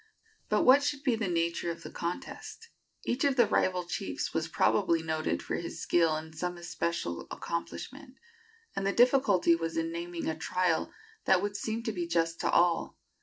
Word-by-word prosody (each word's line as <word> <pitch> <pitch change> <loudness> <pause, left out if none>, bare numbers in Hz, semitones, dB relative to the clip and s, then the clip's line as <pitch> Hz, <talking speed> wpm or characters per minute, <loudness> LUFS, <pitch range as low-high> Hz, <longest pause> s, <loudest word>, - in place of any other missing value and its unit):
But 210 - +3
what 265 +3 +7
should 285 -1 -2
be 255 -6 +2
the 220 -2 -2
nature 170 0 0
of 170 0 -5
the - - -8
contest? 180 - -6 0.4
Each 250 +4 0
of 280 -2 +3
the 240 -3 +6
rival 185 -3 +1
chiefs 185 +3 -3
was 160 0 0
probably 170 -1 +2
noted 160 -1 -1
for - - -2
his 170 - -6
skill 165 -2 +2
in 160 0 -8
some 175 +2 -3
especial 170 - -3
accomplishment, 260 - -6 0.6
and 195 - -1
the 200 - +1
difficulty 235 -9 +4
was 165 0 -3
in 165 0 -1
naming 170 0 -4
a 160 - 0
trial 180 - 0 0.3
that 190 0 +4
would 205 0 -2
seem 220 +2 -3
to 225 - -1
be 175 -4 -3
just 165 -1 0
to - - 0
all. 175 -1 +2
175 Hz, 180 wpm, -30 LUFS, 165-220 Hz, 0.6 s, what